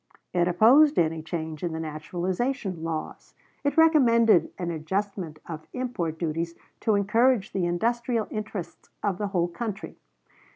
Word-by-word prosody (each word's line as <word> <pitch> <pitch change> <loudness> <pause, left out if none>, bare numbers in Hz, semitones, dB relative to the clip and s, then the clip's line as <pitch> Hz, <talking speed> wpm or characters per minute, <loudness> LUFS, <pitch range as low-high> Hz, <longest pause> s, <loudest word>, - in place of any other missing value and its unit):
It 175 -1 +2
opposed 250 - +6
any 160 -1 +2
change 160 -1 -5
in 170 -2 -2
the 160 - -3
naturalization 180 - -3
laws. 160 -1 -5 0.3
It 285 +2 0
recommended 235 - +5
an 175 -2 -3
adjustment 180 0 -3
of 155 -2 -7
import 210 -11 -3
duties 165 +1 -2 0.2
to 220 - +2
encourage 225 +2 +2
the 185 -3 0
industrial 235 +5 0
interests 205 -5 -6
of 195 -3 0
the 205 - -1
whole 180 -3 0
country. 210 +3 -6
185 Hz, 135 wpm, -26 LUFS, 165-230 Hz, 0.3 s, opposed